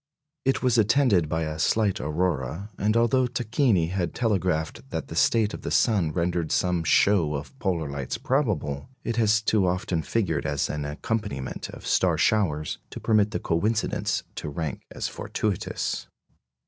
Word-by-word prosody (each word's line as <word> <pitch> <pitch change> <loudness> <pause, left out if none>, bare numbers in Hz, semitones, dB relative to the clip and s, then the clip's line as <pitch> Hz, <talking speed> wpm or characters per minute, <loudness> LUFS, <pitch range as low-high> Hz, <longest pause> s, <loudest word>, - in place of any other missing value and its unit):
It 135 0 +1
was 125 -2 +3
attended 110 - +3
by 80 +1 0
a 80 0 -4
slight 105 +3 +2
aurora, 80 - -2
and 110 +3 +2
although 125 +2 +3
Tacchini 120 - +1
had 95 -2 -2
telegraphed 90 - -1
that - - -4
the - - -6
state 110 -2 +3
of - - -6
the - - -4
sun 100 -9 +2
rendered 85 -1 -1
some 90 -2 +1
show 80 -3 +3
of 70 -1 -6
polar 85 -5 -1
lights 70 -2 -4
probable, 105 - -1
it 115 -1 -2
has 110 -1 +3
too 105 -4 +2
often 90 -2 0
figured 80 -7 -1
as 70 -1 0
an 75 -1 -3
accompaniment 75 - -3
of - - -10
star - - +2
showers 80 -9 +1
to - - -7
permit 105 -2 +3
the 105 - -3
coincidence 105 +7 0
to 75 - -4
rank 75 -1 -4
as - - -3
fortuitous. 105 -4 -3
95 Hz, 160 wpm, -26 LUFS, 80-110 Hz, -, was